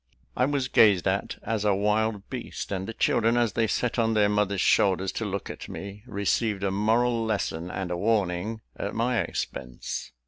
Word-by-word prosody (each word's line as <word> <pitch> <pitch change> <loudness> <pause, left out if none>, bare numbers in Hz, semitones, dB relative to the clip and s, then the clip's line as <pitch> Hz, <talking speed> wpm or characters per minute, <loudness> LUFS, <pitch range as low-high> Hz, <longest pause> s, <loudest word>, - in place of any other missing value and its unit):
I - - +3
was 140 -2 0
gazed 100 -8 +5
at 100 +1 -1
as 110 -1 -1
a 105 -2 +3
wild 105 0 0
beast; - - -6
and 95 -1 -2
the 115 - -5
children, 115 +1 +2
as 120 -4 +2
they 115 -1 +1
sat 125 +3 -1
on 115 -1 +2
their 105 -1 +4
mothers' 105 -1 +1
shoulders 95 0 +3
to 115 - -3
look 100 -1 -3
at - - -9
me, 100 +1 -7
received 100 -1 0
a 100 - +1
moral 115 +4 +2
lesson 95 -6 -2
and 90 -1 -4
a 90 - -1
warning 105 +1 0
at 100 - -4
my 120 +1 +1
expense. 65 -7 -5
105 Hz, 185 wpm, -27 LUFS, 95-115 Hz, -, gazed